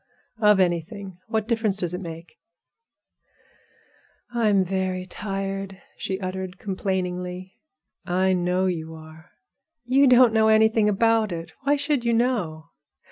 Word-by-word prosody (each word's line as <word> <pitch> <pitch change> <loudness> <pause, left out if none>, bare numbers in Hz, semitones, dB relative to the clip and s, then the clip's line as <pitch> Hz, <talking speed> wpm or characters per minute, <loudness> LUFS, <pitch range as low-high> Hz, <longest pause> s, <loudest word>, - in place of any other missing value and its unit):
"Of 210 -3 +5
anything. 180 +1 -2
What 220 -1 -1
difference 225 -4 0
does 180 -3 -2
it 180 - -4
make?" 165 -1 -9 1.9
"I'm 215 -5 +2
very 185 0 -2
tired," 195 0 -5 0.2
she 190 0 -3
uttered, 185 -1 -5
complainingly. 185 -1 -3 0.5
"I 185 +1 +1
know 180 +1 +1
you 160 -3 -3
are." 160 +2 -14 0.6
"You 270 +3 +4
don't 250 -2 +6
know 220 -1 +4
anything 220 0 +4
about 225 0 +2
it. 165 -1 -6
Why 285 +1 +4
should 285 -3 -1
you 235 -1 +1
know? 185 -10 -1
190 Hz, 125 wpm, -24 LUFS, 180-220 Hz, 1.9 s, don't